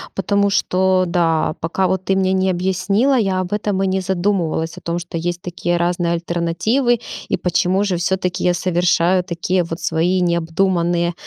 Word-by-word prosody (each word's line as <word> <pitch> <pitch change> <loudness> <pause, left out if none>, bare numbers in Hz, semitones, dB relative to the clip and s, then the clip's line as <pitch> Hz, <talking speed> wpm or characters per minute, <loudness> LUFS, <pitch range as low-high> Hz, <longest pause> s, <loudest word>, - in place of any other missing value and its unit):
потому 200 +1 +1
что, 185 -1 +2
да, 165 -3 +1
пока 180 +3 0
вот 190 0 -2
ты 195 - +1
мне 190 0 +1
не 190 0 +1
объяснила, 190 +8 +1
я 195 -6 +1
об 185 +1 -3
этом 205 -2 -1
и - - +1
не 190 0 0
задумывалась, 175 -3 -1
о - - -9
том, 170 +1 -3
что 170 0 -6
есть 175 +1 -3
такие 175 0 -2
разные 175 0 0
альтернативы, 175 +9 0 0.3
и - - +1
почему 185 +2 +1
же 190 -3 0
всё-таки 185 0 -1
я 180 - +3
совершаю 175 +1 +2
такие 180 +1 -1
вот 165 0 -6
свои 170 +3 +1
необдуманные 170 0 0
180 Hz, 170 wpm, -19 LUFS, 170-190 Hz, 0.3 s, я